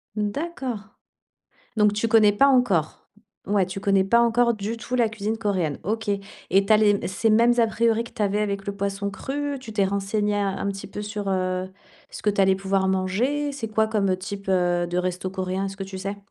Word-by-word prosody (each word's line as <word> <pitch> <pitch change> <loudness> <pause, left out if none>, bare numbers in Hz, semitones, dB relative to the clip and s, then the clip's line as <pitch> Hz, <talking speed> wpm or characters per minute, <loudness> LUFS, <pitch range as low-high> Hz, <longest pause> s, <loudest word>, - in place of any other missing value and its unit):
Mmh, 210 -1 0
d'accord, 270 -5 -4 1.0
donc 210 -1 +4
tu 215 +2 0
connais 215 -2 +5
pas 240 +7 +4
encore? 245 - +1 0.4
Ouais, 195 -1 +2
tu 190 +1 -6
connais 195 -1 +3
pas 235 +5 +4
encore 235 0 +3
du 215 +2 -4
tout 235 +2 -5
la 240 -3 +3
cuisine 215 0 -3
coréenne? 190 -9 -1
OK, 220 +2 -3
et 200 -1 -1
tu 220 - +4
as - - +8
les 205 -2 +3
ces 205 +4 0
mêmes 230 +2 +5
a 230 - +5
priori 230 +1 +1
que 235 - -11
tu 215 - -3
avais 205 +1 +1
avec 200 -1 -2
le 200 - -3
poisson 200 0 -2
cru? 285 +6 -4
Tu 235 -4 -10
t'es 205 -2 +2
renseigné, 200 +2 -1
a 205 -1 +1
un - - -2
petit 195 -1 -5
peu 210 - -7
sur, 205 -1 -4
heu, 185 -1 -1 0.4
ce - - -9
que 210 - +3
tu 200 - -1
allais 190 0 +5
pouvoir 195 0 0
manger? 220 +11 0
C'est 260 -5 -5
quoi 220 0 +2
comme, 210 -3 +1
heu, 185 - +1
type, 200 +1 -7
heu, 175 -2 +2
de 175 - -3
resto 180 +1 -1
coréen? 190 0 -3
Est-ce 195 0 -7
que 195 - -5
tu 190 0 -8
sais? 195 +2 -4
205 Hz, 225 wpm, -24 LUFS, 195-225 Hz, 1.0 s, as